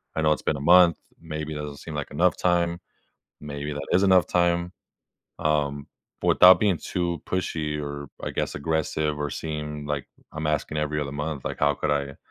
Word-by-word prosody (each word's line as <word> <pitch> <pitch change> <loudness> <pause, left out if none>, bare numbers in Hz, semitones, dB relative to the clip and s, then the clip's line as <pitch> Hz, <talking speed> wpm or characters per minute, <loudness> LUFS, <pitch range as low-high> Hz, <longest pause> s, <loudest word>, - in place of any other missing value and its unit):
I 80 - 0
know 75 -1 +3
it's 75 - 0
been - - 0
a - - -7
month. 85 +1 +6 0.2
Maybe 75 0 -5
it - - -5
doesn't 75 -1 -6
seem 80 - -8
like 75 -1 -4
enough 85 +5 +2
time. 85 -1 +1 0.6
Maybe 75 0 -5
that 75 -1 -5
is 90 - +4
enough 95 -3 +5
time." 85 0 +1 0.7
Um, 70 -2 0 0.4
without 90 -1 +7
being 100 -5 +2
too 85 -1 -3
pushy 80 -5 -2
or, 70 -1 -6
I - - -3
guess, - - -2
aggressive 75 0 -1
or 75 0 -1
seem, 75 -1 -5
like, 75 -2 -3 0.2
I'm 80 0 -3
asking 75 0 -1
every 75 0 -1
other 70 -2 -3
month, 75 -1 -4
like, - - -4
how 75 0 +3
could - - -1
I 70 -1 -1
75 Hz, 190 wpm, -25 LUFS, 75-85 Hz, 0.7 s, without